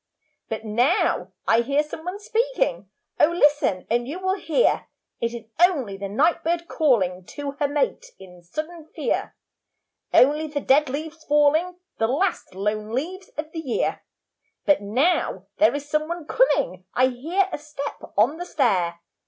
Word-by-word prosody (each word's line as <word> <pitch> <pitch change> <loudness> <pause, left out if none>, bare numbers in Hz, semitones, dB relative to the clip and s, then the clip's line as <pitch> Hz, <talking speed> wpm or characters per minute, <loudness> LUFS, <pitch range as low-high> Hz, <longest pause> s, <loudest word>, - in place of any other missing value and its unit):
'But 220 0 -4
now 245 - +1 0.2
I 225 +1 +5
hear 280 +5 +1
some 305 +1 -8
one 365 +3 -4
speaking, - - -1 0.3
Oh 300 - +6
listen 290 - +2
and 240 +1 0
you 300 +6 -4
will 375 0 0
hear.' 385 +4 +1 0.3
It 235 - -1
is 235 -2 -7 0.2
only 295 - +3
the 195 0 -5
night 320 - +2
bird 340 +1 -1
calling 190 - +1
To 285 +9 -6
her 290 - +2
mate 295 - -1
in 180 -2 -14
sudden 310 - -6
fear. - - -1 0.8
Only 300 +4 +4
the 295 -1 -3
dead 285 +1 +3
leaves 315 +3 -5
falling; 300 +5 +3 0.2
The 225 - +3
last 310 - -1
lone 210 +2 -2
leaves 365 +9 -3
of 310 +1 -4
the 325 - -5
year. 270 -7 -1 0.6
'But 295 -7 +4
now 240 - +1
there 220 +5 +4
is 290 0 -5
some 305 +1 0
one 340 -1 -5
coming, 185 - +2
I 255 - +5
hear 330 +10 0
a - - -4
step 290 -1 -6 0.2
on 245 +10 +3
the 355 - -5
stair.' 180 - +1
290 Hz, 160 wpm, -24 LUFS, 230-330 Hz, 0.8 s, Oh